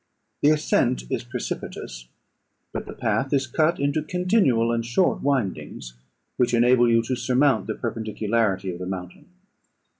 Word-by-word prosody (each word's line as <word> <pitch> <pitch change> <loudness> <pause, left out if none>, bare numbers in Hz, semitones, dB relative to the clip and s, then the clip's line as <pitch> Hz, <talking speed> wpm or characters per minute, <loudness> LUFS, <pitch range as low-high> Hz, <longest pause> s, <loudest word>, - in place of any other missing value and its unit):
The 145 - +5
ascent 150 - +2
is - - -1
precipitous, - - -6 0.7
but - - -5
the - - -7
path 135 +1 -1
is 140 -1 +2
cut 155 +6 +1
into 145 +2 +1
continual 180 - +2
and 115 0 0
short 120 +11 +1
windings, 110 - -2 0.4
which 125 -1 +2
enable 120 0 +4
you 115 0 +3
to 130 +2 -2
surmount 125 +1 +2
the - - -2
perpendicularity 110 -3 -1
of 85 - -8
the 90 - -5
mountain. 90 -1 -7
120 Hz, 145 wpm, -24 LUFS, 105-140 Hz, 0.7 s, The